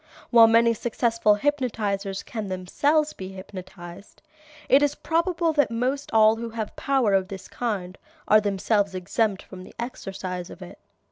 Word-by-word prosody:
While 230 Hz, -2 st, +8 dB
many 230 Hz, +1 st, +4 dB
successful 230 Hz, -2 st, +1 dB
hypnotizers 210 Hz, -7 st, -2 dB
can 220 Hz, -3 st, -5 dB
themselves 285 Hz, -, 0 dB
be 190 Hz, 0 st, -8 dB
hypnotized, 185 Hz, -1 st, -11 dB, 0.4 s
it 275 Hz, -, +5 dB
is 290 Hz, 0 st, +1 dB
probable 335 Hz, +1 st, 0 dB
that 290 Hz, -3 st, +2 dB
most 255 Hz, +5 st, -2 dB
all 220 Hz, 0 st, +5 dB
who 230 Hz, 0 st, -5 dB
have 220 Hz, -2 st, -5 dB
power 265 Hz, -7 st, +1 dB
of 190 Hz, -1 st, +2 dB
this 190 Hz, -2 st, -9 dB
kind 195 Hz, -6 st, -4 dB, 0.3 s
are 215 Hz, 0 st, +6 dB
themselves 200 Hz, 0 st, 0 dB
exempt 195 Hz, +2 st, -1 dB
from 185 Hz, -1 st, -11 dB
the -, -, -15 dB
exercise 190 Hz, -6 st, -6 dB
of -, -, -10 dB
it. -, -, -12 dB
220 Hz, 150 wpm, -25 LUFS, 195-245 Hz, 0.4 s, While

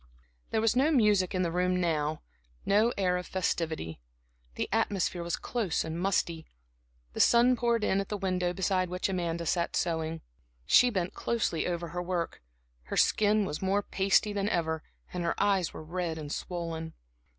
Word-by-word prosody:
There 220 Hz, -, +1 dB
was 225 Hz, +1 st, +2 dB
no 270 Hz, +5 st, +4 dB
music 210 Hz, -, +3 dB
in 185 Hz, -, +1 dB
the 170 Hz, -, -1 dB
room 180 Hz, +1 st, +1 dB
now, 155 Hz, -3 st, -1 dB, 0.4 s
no 215 Hz, +4 st, +4 dB
air 180 Hz, -2 st, +2 dB
of 180 Hz, -, -5 dB
festivity. 160 Hz, -, -2 dB, 0.6 s
The -, -, -2 dB
atmosphere 185 Hz, -3 st, 0 dB
was 170 Hz, 0 st, -1 dB
close 220 Hz, -9 st, -1 dB
and 160 Hz, +1 st, -4 dB
musty, 170 Hz, -3 st, 0 dB, 0.7 s
the -, -, -6 dB
sun 240 Hz, +2 st, +5 dB
poured 235 Hz, -2 st, +1 dB
in 195 Hz, -1 st, +2 dB
at 195 Hz, -, -7 dB
the 210 Hz, -, -2 dB
window 185 Hz, -2 st, 0 dB
beside 185 Hz, 0 st, 0 dB
which 180 Hz, +2 st, -2 dB
Amanda 170 Hz, -2 st, -2 dB
sat 170 Hz, +1 st, 0 dB
sewing. 160 Hz, -1 st, -1 dB, 0.4 s
She 250 Hz, -, +6 dB
bent 185 Hz, -4 st, -2 dB
closely 225 Hz, -8 st, -1 dB
over 170 Hz, -1 st, -3 dB
her 175 Hz, +3 st, -3 dB
work, 175 Hz, -1 st, -3 dB, 0.4 s
her -, -, -4 dB
skin 210 Hz, 0 st, +3 dB
was 150 Hz, -, -4 dB
more 195 Hz, +2 st, +1 dB
pasty 195 Hz, +2 st, +2 dB
than 200 Hz, 0 st, 0 dB
ever 160 Hz, -3 st, -1 dB, 0.3 s
and 180 Hz, -1 st, -2 dB
her 170 Hz, -, 0 dB
eyes 195 Hz, -4 st, +2 dB
were -, -, -9 dB
red 170 Hz, 0 st, -3 dB
and 150 Hz, -2 st, -6 dB
swollen. 165 Hz, -2 st, -4 dB
180 Hz, 175 wpm, -29 LUFS, 170-200 Hz, 0.7 s, She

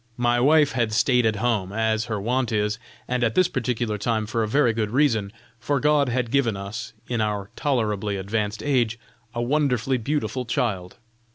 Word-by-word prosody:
My 120 Hz, 0 st, +2 dB
wife 145 Hz, +3 st, +4 dB
had 115 Hz, -3 st, 0 dB
stayed 125 Hz, +1 st, +3 dB
at 110 Hz, -, +1 dB
home, 110 Hz, -4 st, 0 dB
as 110 Hz, 0 st, 0 dB
her 110 Hz, -3 st, -3 dB
wont 120 Hz, +4 st, 0 dB
is, 105 Hz, 0 st, 0 dB, 0.3 s
and 125 Hz, -1 st, 0 dB
at 115 Hz, -1 st, +1 dB
this 185 Hz, -1 st, +4 dB
particular 120 Hz, -, -2 dB
time 110 Hz, +1 st, 0 dB
for 115 Hz, +2 st, -1 dB
a 110 Hz, -, 0 dB
very 120 Hz, 0 st, +3 dB
good 110 Hz, -1 st, -1 dB
reason, 115 Hz, -6 st, +1 dB, 0.3 s
for 140 Hz, +4 st, 0 dB
God 145 Hz, -1 st, +3 dB
had 120 Hz, -1 st, -1 dB
given 120 Hz, -7 st, +2 dB
us, 110 Hz, +3 st, -6 dB
in 120 Hz, -2 st, -1 dB
our 105 Hz, -1 st, -2 dB
tolerably 105 Hz, -7 st, -1 dB
advanced 105 Hz, +2 st, -2 dB
age, 120 Hz, -6 st, +1 dB, 0.4 s
a 120 Hz, -, -1 dB
wonderfully 130 Hz, -2 st, +1 dB
beautiful 135 Hz, +1 st, -2 dB
child. 100 Hz, -6 st, -2 dB
115 Hz, 180 wpm, -24 LUFS, 110-130 Hz, 0.4 s, wife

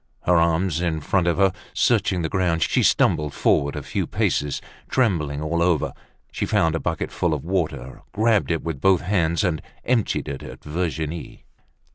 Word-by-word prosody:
Her 90 Hz, -, +3 dB
arms 85 Hz, 0 st, +2 dB
in 85 Hz, -3 st, 0 dB
front 85 Hz, +4 st, 0 dB
of 85 Hz, -, +2 dB
her, 95 Hz, -2 st, +3 dB, 0.2 s
searching 90 Hz, -3 st, +2 dB
the -, -, 0 dB
ground, 85 Hz, -1 st, +1 dB
she -, -, +2 dB
stumbled 75 Hz, -2 st, +2 dB
forward 70 Hz, 0 st, +2 dB
a -, -, -5 dB
few -, -, -2 dB
paces. 75 Hz, -1 st, 0 dB, 0.3 s
Trembling 75 Hz, -, 0 dB
all 85 Hz, +2 st, -1 dB
over, 85 Hz, -3 st, +1 dB, 0.4 s
she -, -, -2 dB
found 80 Hz, -1 st, +2 dB
a 80 Hz, -, -1 dB
bucket 80 Hz, -2 st, -2 dB
full 85 Hz, -3 st, 0 dB
of 75 Hz, 0 st, -7 dB
water, 75 Hz, -8 st, -2 dB
grabbed 110 Hz, -1 st, +2 dB
it 80 Hz, -2 st, -1 dB
with 80 Hz, -5 st, -4 dB
both 95 Hz, -2 st, +4 dB
hands, 85 Hz, -3 st, +1 dB
and 85 Hz, -6 st, 0 dB, 0.2 s
emptied 120 Hz, -4 st, 0 dB
it -, -, -5 dB
at -, -, -10 dB
Virginie. 80 Hz, 0 st, -4 dB
85 Hz, 175 wpm, -23 LUFS, 75-90 Hz, 0.4 s, both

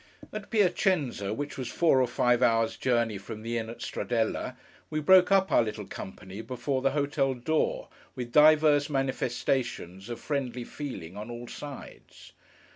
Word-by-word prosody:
At 215 Hz, -1 st, -6 dB
Piacenza, 180 Hz, -, +1 dB
which 145 Hz, +5 st, -4 dB
was 130 Hz, -, -3 dB
four 160 Hz, -6 st, +3 dB
or 130 Hz, -, +2 dB
five 125 Hz, 0 st, +2 dB
hours' 115 Hz, -2 st, +3 dB
journey 120 Hz, -5 st, 0 dB
from 110 Hz, +2 st, -8 dB
the 115 Hz, +1 st, -1 dB
inn 110 Hz, 0 st, -5 dB
at 120 Hz, +1 st, -8 dB
Stradella, 115 Hz, -2 st, -2 dB, 0.3 s
we 155 Hz, -, -1 dB
broke 185 Hz, +4 st, +6 dB
up 195 Hz, -1 st, +4 dB
our -, -, +5 dB
little 110 Hz, -2 st, -4 dB
company 95 Hz, +2 st, -8 dB
before 130 Hz, +3 st, -2 dB
the 135 Hz, -, +3 dB
hotel 140 Hz, -2 st, +1 dB
door, 155 Hz, +6 st, -1 dB, 0.3 s
with 125 Hz, -2 st, -5 dB
divers 150 Hz, 0 st, +5 dB
manifestations 125 Hz, -, -2 dB
of 120 Hz, -, -5 dB
friendly 125 Hz, -4 st, -3 dB
feeling 110 Hz, -, -7 dB
on 105 Hz, +3 st, -7 dB
all 120 Hz, 0 st, -7 dB
sides. 145 Hz, +1 st, -10 dB
125 Hz, 155 wpm, -28 LUFS, 115-145 Hz, 0.3 s, broke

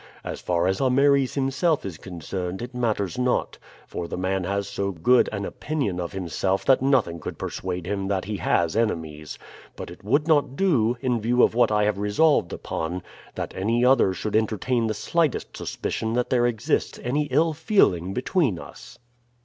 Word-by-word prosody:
As -, -, -6 dB
far 85 Hz, -1 st, 0 dB
as 95 Hz, +5 st, 0 dB
Ameres 135 Hz, 0 st, +3 dB
himself 140 Hz, +3 st, +1 dB
is 90 Hz, -5 st, -6 dB
concerned 90 Hz, +2 st, -5 dB
it 125 Hz, +1 st, -7 dB
matters 110 Hz, -5 st, -1 dB
not, 125 Hz, 0 st, 0 dB, 0.3 s
for 85 Hz, -, -5 dB
the -, -, -5 dB
man 95 Hz, 0 st, -1 dB
has 100 Hz, +1 st, -1 dB
so 100 Hz, 0 st, -2 dB
good 100 Hz, +9 st, +3 dB
an 100 Hz, -2 st, -3 dB
opinion 135 Hz, -, -3 dB
of 85 Hz, -1 st, -3 dB
himself 95 Hz, +1 st, -2 dB
that 135 Hz, -2 st, +4 dB
nothing 130 Hz, -11 st, +2 dB
could -, -, -6 dB
persuade 90 Hz, -2 st, -4 dB
him 100 Hz, 0 st, -2 dB
that 95 Hz, -1 st, -1 dB
he 105 Hz, 0 st, -3 dB
has 85 Hz, -1 st, +1 dB
enemies; 80 Hz, -9 st, -2 dB, 0.4 s
but -, -, -7 dB
it 90 Hz, -, -13 dB
would 140 Hz, +9 st, +1 dB
not 145 Hz, -4 st, +2 dB
do, 125 Hz, -, +2 dB
in 125 Hz, -4 st, 0 dB
view 120 Hz, +3 st, +3 dB
of -, -, +4 dB
what 120 Hz, -1 st, +3 dB
I 105 Hz, 0 st, +3 dB
have 105 Hz, -1 st, 0 dB
resolved 105 Hz, -, +2 dB
upon, 85 Hz, +3 st, -4 dB, 0.3 s
that -, -, -4 dB
any 115 Hz, +6 st, +1 dB
other 125 Hz, -7 st, +5 dB
should 105 Hz, +3 st, -3 dB
entertain 110 Hz, +2 st, +1 dB
the 110 Hz, -, -2 dB
slightest 165 Hz, +5 st, -1 dB
suspicion 110 Hz, 0 st, -3 dB
that 125 Hz, 0 st, -1 dB
there 120 Hz, -1 st, +3 dB
exists 115 Hz, -3 st, -1 dB
any 145 Hz, +5 st, 0 dB
ill 155 Hz, +4 st, +2 dB
feeling 145 Hz, -, +2 dB
between 125 Hz, -, 0 dB
us." -, -, -12 dB
110 Hz, 180 wpm, -24 LUFS, 95-130 Hz, 0.4 s, other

